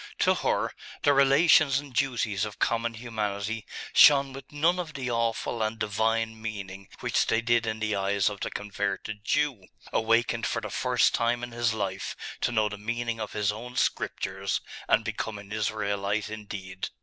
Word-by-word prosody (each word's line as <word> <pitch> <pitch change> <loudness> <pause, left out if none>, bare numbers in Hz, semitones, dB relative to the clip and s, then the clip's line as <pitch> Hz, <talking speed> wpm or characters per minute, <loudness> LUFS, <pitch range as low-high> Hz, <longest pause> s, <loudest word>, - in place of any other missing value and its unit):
To - - +4
her, - - 0 0.3
the 145 - +5
relations 140 +1 +5
and 140 -2 -6
duties 120 -7 0
of 105 -1 -4
common 115 0 0
humanity 110 -2 -3 0.3
shone 140 -2 +7
with 135 - -10
none 165 +5 +2
of 160 -5 -5
the 130 -3 -3
awful 115 0 -1
and 110 +1 -1
divine 110 +1 0
meaning 100 -3 -6
which - - +1
they 115 - +3
did 115 0 +2
in 110 0 -1
the 110 -1 0
eyes 100 0 +1
of 105 -1 -1
the - - -2
converted 105 0 -4
Jew, 135 -7 0 0.3
awakened 115 +1 +2
for - - -1
the - - -6
first - - +2
time 120 +1 +1
in 120 - -5
his 115 -1 0
life 95 -2 -3 0.3
to - - +1
know 110 -2 +2
the 105 -1 -6
meaning 115 +1 -2
of 110 - -5
his 105 -1 +1
own 120 +4 -8
scriptures, 95 -5 -1 0.3
and - - +4
become 110 -1 -3
an 100 0 -11
Israelite 105 -1 -1
indeed. 100 -3 -6
110 Hz, 175 wpm, -28 LUFS, 105-120 Hz, 0.3 s, shone